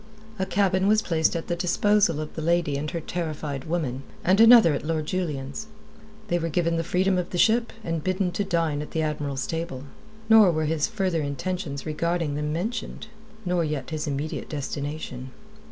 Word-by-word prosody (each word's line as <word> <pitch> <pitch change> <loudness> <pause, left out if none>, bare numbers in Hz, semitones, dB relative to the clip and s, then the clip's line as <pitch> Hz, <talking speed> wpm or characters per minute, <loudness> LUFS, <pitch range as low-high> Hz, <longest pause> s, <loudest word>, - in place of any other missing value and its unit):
A 190 - 0
cabin 190 -1 +2
was 215 +1 +4
placed 160 -2 +1
at 165 - -3
the 175 - -1
disposal 180 -1 +2
of 155 0 -5
the 160 - -5
lady 170 -2 +1
and 150 +2 -2
her 170 - -3
terrified 155 -5 -4
woman, 155 -6 -2 0.2
and 190 +4 +4
another 225 -8 +8
at 140 - -3
Lord 155 0 -1
Julian's. 155 +2 -3 0.6
They 175 -3 +1
were 165 0 -2
given 170 +1 +1
the 165 - 0
freedom 185 +2 +1
of 180 - -3
the 180 - -4
ship, 230 +5 +3
and 165 -4 -2
bidden 185 0 0
to 180 +4 -1
dine 165 -6 0
at 150 - -7
the 160 - 0
Admiral's 145 -3 -2
table; 160 -5 -4 0.4
nor 220 -3 +7
were 155 -2 0
his 155 -1 +1
further 190 -7 -1
intentions 145 +1 -4
regarding 165 0 -1
them 150 +1 -2
mentioned, 215 +5 -4 0.4
nor 180 -1 +1
yet 150 -4 -3
his 155 -1 -3
immediate 145 +2 -3
destination. 145 -3 -5
165 Hz, 185 wpm, -25 LUFS, 150-185 Hz, 0.6 s, another